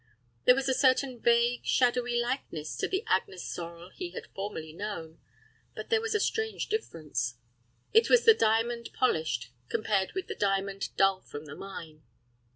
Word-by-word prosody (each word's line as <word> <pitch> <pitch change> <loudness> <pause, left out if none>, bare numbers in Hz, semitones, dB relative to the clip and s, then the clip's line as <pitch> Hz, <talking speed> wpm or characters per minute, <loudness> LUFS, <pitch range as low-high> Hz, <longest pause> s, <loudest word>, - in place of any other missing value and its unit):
There 250 - +8
was 270 0 -1
a 265 - +3
certain 260 -1 +2
vague, 235 +1 +3
shadowy 245 -1 +2
likeness 240 - -3
to - - 0
the 385 +3 -1
Agnes 190 - 0
Sorel 170 +1 -7
he 360 -2 -6
had - - -7
formerly 160 -6 -5
known, 165 -4 -6 0.6
but - - -4
yet - - -28
there 450 -1 +4
was 450 -1 -2
a - - +3
strange 440 +1 -1
difference. 155 - -2 0.6
It 450 +1 +6
was 480 -1 +5
the 450 - +10
diamond 230 - +1
polished, 155 - 0 0.2
compared 200 -3 0
with 380 -1 -3
the - - -5
diamond 195 -1 -1
dull 195 -1 +4
from 145 +1 -9
the 145 - -9
mine. 165 -6 -9
220 Hz, 165 wpm, -29 LUFS, 170-260 Hz, 0.6 s, the